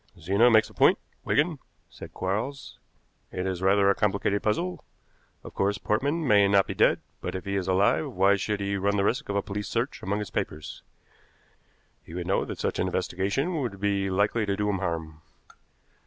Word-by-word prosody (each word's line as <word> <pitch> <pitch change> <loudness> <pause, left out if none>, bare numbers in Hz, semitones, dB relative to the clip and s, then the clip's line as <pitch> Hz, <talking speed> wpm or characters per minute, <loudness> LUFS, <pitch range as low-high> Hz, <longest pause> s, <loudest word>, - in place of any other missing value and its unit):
"Zena 100 +9 +4
makes 110 -2 +5
a - - -16
point, - - +4 0.3
Wigan," 150 0 +1 0.3
said - - -11
Quarles. 105 +9 -4 0.5
"It 90 - -3
is 95 -1 -3
rather 100 +1 +4
a 100 - +5
complicated 100 0 0
puzzle. 90 -5 -1 0.6
Of - - -10
course, 100 +1 0
Portman 140 +11 -1
may 100 -3 +5
not 100 -1 +4
be - - -4
dead, - - +3 0.2
but - - -4
if 95 - -5
he 100 0 -2
is 95 -2 -2
alive 95 -4 +2
why 95 +2 +4
should 100 +1 -2
he 100 0 -1
run 100 +1 0
the 100 - +2
risk 125 +7 -1
of 100 - -2
a 100 - +1
police 105 +1 -4
search 120 +4 -2
among 100 +2 -1
his 105 -2 -5
papers? 75 0 -4 1.2
He 80 - -11
would 90 -1 -4
know 95 - +1
that - - -6
such - - -2
an - - +1
investigation 135 - -1
would 110 -7 -4
be 100 -1 0
likely 105 +4 +1
to 100 0 0
do 105 0 0
him 95 - -2
harm. 80 -2 -4
100 Hz, 195 wpm, -27 LUFS, 95-105 Hz, 1.2 s, makes